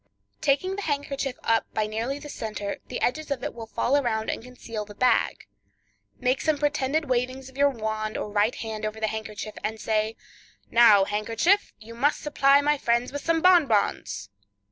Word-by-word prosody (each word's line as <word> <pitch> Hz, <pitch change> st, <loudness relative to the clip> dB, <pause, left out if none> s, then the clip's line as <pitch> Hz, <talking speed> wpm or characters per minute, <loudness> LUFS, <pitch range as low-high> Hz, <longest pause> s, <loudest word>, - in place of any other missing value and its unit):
Taking 370 Hz, +7 st, +1 dB
the -, -, -3 dB
handkerchief 280 Hz, -5 st, -2 dB
up 225 Hz, 0 st, +1 dB
by 215 Hz, -, +1 dB
nearly 225 Hz, +6 st, -3 dB
the 290 Hz, +1 st, -9 dB
center, 215 Hz, -7 st, -4 dB
the 250 Hz, -, -4 dB
edges 310 Hz, +5 st, -1 dB
of 280 Hz, -3 st, -2 dB
it -, -, -3 dB
will 230 Hz, -1 st, -8 dB
fall 245 Hz, +4 st, 0 dB
around 225 Hz, -6 st, 0 dB
and -, -, -5 dB
conceal 230 Hz, -3 st, -7 dB
the 205 Hz, 0 st, -12 dB
bag; 250 Hz, +3 st, +2 dB, 0.7 s
make 255 Hz, +1 st, +1 dB
some 310 Hz, -2 st, +1 dB
pretended 295 Hz, +1 st, 0 dB
wavings 255 Hz, +1 st, -1 dB
of 265 Hz, -, -19 dB
your 285 Hz, +1 st, +4 dB
wand 215 Hz, -3 st, -3 dB
or -, -, -3 dB
right 210 Hz, +3 st, +2 dB
hand 220 Hz, -1 st, -5 dB
over 215 Hz, +1 st, -3 dB
the 220 Hz, -, 0 dB
handkerchief, 215 Hz, -1 st, -5 dB
and 220 Hz, +1 st, -3 dB
say, 215 Hz, +1 st, 0 dB, 0.6 s
"Now, 220 Hz, -4 st, +7 dB
handkerchief, 225 Hz, -, +1 dB
you 220 Hz, +2 st, -12 dB
must 275 Hz, +6 st, +1 dB
supply 280 Hz, -1 st, +4 dB
my 295 Hz, 0 st, +1 dB
friends 235 Hz, 0 st, +1 dB
with 285 Hz, +1 st, -5 dB
some 330 Hz, -1 st, +1 dB
bonbons." 225 Hz, -, +3 dB
240 Hz, 180 wpm, -26 LUFS, 220-280 Hz, 0.7 s, Now